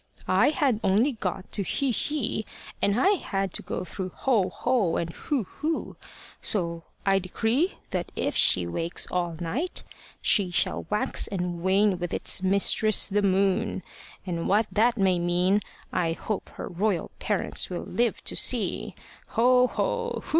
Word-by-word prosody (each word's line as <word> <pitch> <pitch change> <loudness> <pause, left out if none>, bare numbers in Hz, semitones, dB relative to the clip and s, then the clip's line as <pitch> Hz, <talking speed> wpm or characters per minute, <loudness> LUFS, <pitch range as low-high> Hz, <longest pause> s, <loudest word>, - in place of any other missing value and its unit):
"I - - +4
had 275 -7 +1
only 215 +9 +3
got 190 -5 -5
to 200 - +1
Hi, 270 +6 0
hi! 275 -7 -1 0.4
and 200 +3 +2
I 375 - +4
had 195 - -1
to - - 0
go - - -4
through 185 +1 -5 0.2
Ho, 220 -9 +3
ho! 225 -4 0
and 165 0 -2
Hu, 265 - -2
hu! 310 - -4 0.5
So 170 -5 0 0.2
I 195 -1 +4
decree 225 - 0 0.2
that - - -3
if - - -1
she 90 -2 +5
wakes 165 - -1
all 175 -2 -1
night 255 - -3 0.4
she 195 -3 +2
shall 175 - 0
wax 210 0 +2
and 180 -3 -3
wane 190 +1 +2
with 175 -1 -3
its - - -1
mistress, 200 +2 +4
the 205 0 0
moon. 195 +1 +1 0.4
And 170 -3 -3
what 210 +3 +3
that 235 +3 +2
may 190 -3 +2
mean 180 +4 +2 0.3
I 165 -2 +1
hope 210 +4 -4
her - - -6
royal 185 -1 -1
parents 205 -3 0
will 180 -2 -4
live 240 -1 -1
to - - -4
see. - - +1 0.3
Ho, 250 +2 +4
ho! 475 - -2
200 Hz, 155 wpm, -26 LUFS, 180-230 Hz, 0.5 s, she